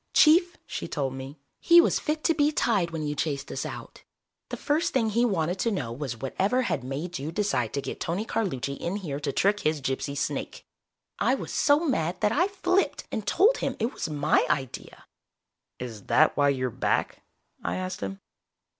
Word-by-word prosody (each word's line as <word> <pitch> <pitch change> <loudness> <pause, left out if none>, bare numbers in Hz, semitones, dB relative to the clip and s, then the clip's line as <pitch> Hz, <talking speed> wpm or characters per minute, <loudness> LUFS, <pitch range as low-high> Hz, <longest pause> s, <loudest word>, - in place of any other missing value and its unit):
"Chief," 345 +3 +5
she - - -5
told 135 -2 -2
me. 135 +3 -8 0.2
"He 340 0 +7
was 340 - +4
fit 310 0 -2
to 330 - +3
be 295 -1 +2
tied 205 - +1
when 160 -2 -4
you 150 - -1
chased 145 -2 -3
us - - -3
out. - - -9 0.5
The - - -4
first 305 +2 0
thing 225 -4 +2
he 235 +3 +2
wanted 180 -4 0
to 230 - +1
know 160 - -2
was 125 -1 -4
whatever 195 - 0
had 145 - -1
made 150 +6 -4
you 145 +4 -4
decide 165 - 0
to 140 - -2
get - - -5
Tony 185 +6 -2
Carlucci 140 - -2
in 175 +3 -3
here 160 -9 -4
to 145 -1 -2
trick 205 +7 +2
his 155 -3 0
gypsy 135 +1 -3
snake. - - -3 0.5
I - - +3
was - - -6
so 295 +3 +3
mad 180 - 0
that 210 - +3
I 345 +9 +3
flipped 370 -4 0
and 215 -3 -4
told 440 - +4
him - - -2
it 230 +3 -1
was - - -4
my 150 0 +2
idea." 135 -3 -3 0.7
"Is 115 -5 -7
that 155 - +4
why 145 -1 +3
you're 130 -2 0
back?" - - -1 0.4
I - - -1
asked 185 0 -4
him. 95 0 -5
170 Hz, 195 wpm, -27 LUFS, -, 0.7 s, He